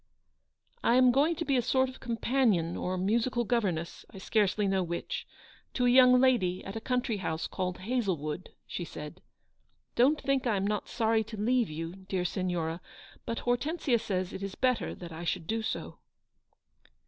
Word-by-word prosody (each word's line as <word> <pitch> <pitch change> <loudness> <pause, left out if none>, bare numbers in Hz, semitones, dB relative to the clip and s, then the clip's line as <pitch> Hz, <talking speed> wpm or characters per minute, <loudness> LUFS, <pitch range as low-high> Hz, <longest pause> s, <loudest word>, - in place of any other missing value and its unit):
"I 235 - +4
am 255 0 +6
going 295 +6 +3
to 330 - -3
be 275 - +2
a - - +3
sort 260 +3 +2
of 260 - -10
companion 230 -7 +1
or 185 +1 -2
musical 235 +6 +1
governess 195 -9 -1
— - - -37
I - - -12
scarcely 205 +1 +1
know 190 -1 +2
which 170 -1 -4 0.2
— - - -27
to 250 - +2
a 245 - +5
young 250 0 +7
lady 230 -9 +2
at 195 - -6
a 225 - -4
country 250 -3 0
house 160 -4 -2
called 180 -1 -3
Hazlewood," 185 - -2 0.2
she 175 - -5
said. 155 +2 -8 0.4
" - - -44
Don't 275 +6 +4
think 275 -2 0
I 225 - +2
am 195 0 0
not 210 0 -2
sorry 225 -1 +2
to 220 0 -8
leave 240 +2 +2
you, 165 +3 -5
dear 185 -2 0
Signora, 175 -2 -2 0.5
but 230 - -2
Hortensia 245 +1 +1
says 185 -3 -2
it - - -6
is 195 -1 -5
better 255 -2 0
that 175 -2 -9
I 160 +1 -7
should 170 0 -2
do 225 +5 -1
so." 220 - -4
215 Hz, 185 wpm, -30 LUFS, 180-250 Hz, 0.5 s, young